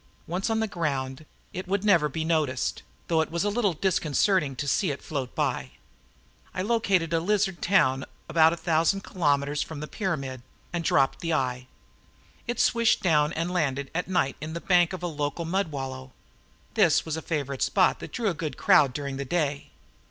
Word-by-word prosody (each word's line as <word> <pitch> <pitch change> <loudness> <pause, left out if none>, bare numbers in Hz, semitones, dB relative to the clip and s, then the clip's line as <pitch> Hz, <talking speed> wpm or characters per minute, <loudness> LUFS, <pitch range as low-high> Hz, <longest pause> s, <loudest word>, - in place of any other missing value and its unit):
Once 180 +6 -2
on 225 0 +1
the 220 - 0
ground, 145 -5 -3 0.3
it 185 +1 -5
would 195 +1 0
never 170 -7 +4
be 160 +3 -3
noticed, 155 -6 0 0.3
though 165 -2 +3
it 160 - -2
was 170 +2 -1
a 205 - +1
little 205 -4 +1
disconcerting 160 -2 +1
to 145 - -4
see 185 +6 +1
it 140 - -4
float 135 -5 -4
by. 65 -1 -1 0.8
I 185 - -1
located 195 -7 +1
a 165 - +3
lizard 195 0 0
town 135 -9 +3 0.2
about 160 0 +5
a 170 - -3
thousand 165 +4 +1
kilometers 145 -4 0
from 160 -2 -5
the 150 - -4
pyramid 140 - -3 0.3
and 170 -1 -1
dropped 135 -4 +2
the 165 -1 -1
eye. 125 -3 -2 0.8
It 240 - -2
swished 235 -2 +3
down 150 -4 +3
and 170 +3 -2
landed 140 -5 -1
at 180 +2 -2
night 180 -7 0
in 155 +1 -5
the 170 - -3
bank 175 -2 +3
of 185 - -5
the 175 - -2
local 150 +1 -3
mud 190 +3 0
wallow. 130 -2 -6 0.6
This - - +3
was 160 -1 -2
a 160 - -4
favorite 140 -5 -3
spot 190 - +3
that - - -8
drew 235 -3 -2
a - - -1
good 155 -2 -5
crowd 140 -4 +5
during 140 0 -4
the 140 - -3
day. 145 -1 -1
160 Hz, 190 wpm, -26 LUFS, 140-185 Hz, 0.8 s, about